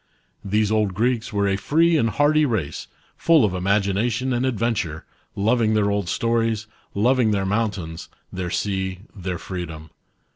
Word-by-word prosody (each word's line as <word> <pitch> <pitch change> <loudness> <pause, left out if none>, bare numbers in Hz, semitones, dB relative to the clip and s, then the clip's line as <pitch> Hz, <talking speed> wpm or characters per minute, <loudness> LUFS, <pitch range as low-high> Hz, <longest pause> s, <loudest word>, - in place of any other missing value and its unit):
These 105 +1 +1
old 105 -4 +1
Greeks 120 +2 0
were 100 -1 +1
a 95 0 +1
free 165 +10 +3
and 115 -7 +2
hardy 145 +7 +3
race, 110 - -2 0.3
full 165 -7 +4
of 100 - -1
imagination 100 +7 0
and 125 +2 +1
adventure, 110 -10 -1 0.3
loving 110 +1 +2
their 100 -1 +2
old 100 -3 -1
stories, 115 0 0 0.3
loving 120 +2 +3
their 100 -2 0
mountains, 95 -6 -2 0.2
their 90 -1 -3
sea, 95 -1 -2
their 90 -2 -4
freedom. 80 -4 -7
105 Hz, 145 wpm, -23 LUFS, 95-115 Hz, 0.3 s, full